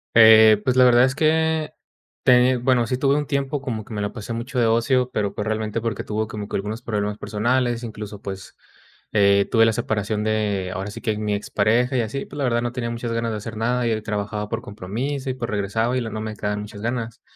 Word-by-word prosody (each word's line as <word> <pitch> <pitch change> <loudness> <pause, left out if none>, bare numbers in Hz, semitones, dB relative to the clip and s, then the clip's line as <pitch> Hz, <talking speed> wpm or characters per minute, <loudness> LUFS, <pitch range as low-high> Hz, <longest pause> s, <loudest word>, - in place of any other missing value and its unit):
Eh, 110 -2 +8
pues, 130 +1 +1
la 130 - +7
verdad 120 0 +6
es 130 0 -1
que 160 0 +1 0.5
teni 125 +1 +5
bueno, 125 -1 +2
sí, 125 - -1
tuve 140 +1 +2
un 145 -1 -1
tiempo 140 0 -1
como 115 -6 -4
que 110 - -10
me 105 - -3
lo 100 - -2
pasé 115 0 -6
mucho 120 +3 -3
de 120 - +3
ocio, 125 +3 +2
pero, 100 -1 -1
pues, 105 - -4
realmente 110 0 -2
porque 115 -3 -3
tuve 110 +1 -2
como 105 -1 -6
que - - -5
algunos 105 +4 -3
problemas 105 -3 -2
personales. 120 +3 0
Incluso, 105 -2 -7
pues, 95 -1 -8 0.6
eh, 100 -1 +4
tuve 115 0 +5
la 115 - +2
separación 105 0 -1
de 105 -4 -1
ahora 95 +3 -4
sí - - -9
que 110 -2 -1
mi 105 -1 -1
ex 100 0 -4
pareja 115 +5 +2
y - - +3
así. 115 +5 -4
Pues, - - -11
la 140 - -1
verdad, 120 -1 +1
no 120 0 -2
tenía 120 -2 -3
muchas 115 0 -4
ganas 115 0 -1
de 110 - -3
hacer 110 +1 -7
nada, 120 +2 0
y 110 -1 0
trabajaba 105 0 -3
por 115 +1 -3
compromiso 125 +8 -4
y - - 0
pues 120 -2 -5
regresaba 110 +4 0
y - - 0
luego 110 -2 -5
no 110 - -4
me 110 0 -5
quedaban 105 0 -3
muchas 105 0 -9
ganas. 115 -1 -3
115 Hz, 240 wpm, -22 LUFS, 105-125 Hz, 0.6 s, Eh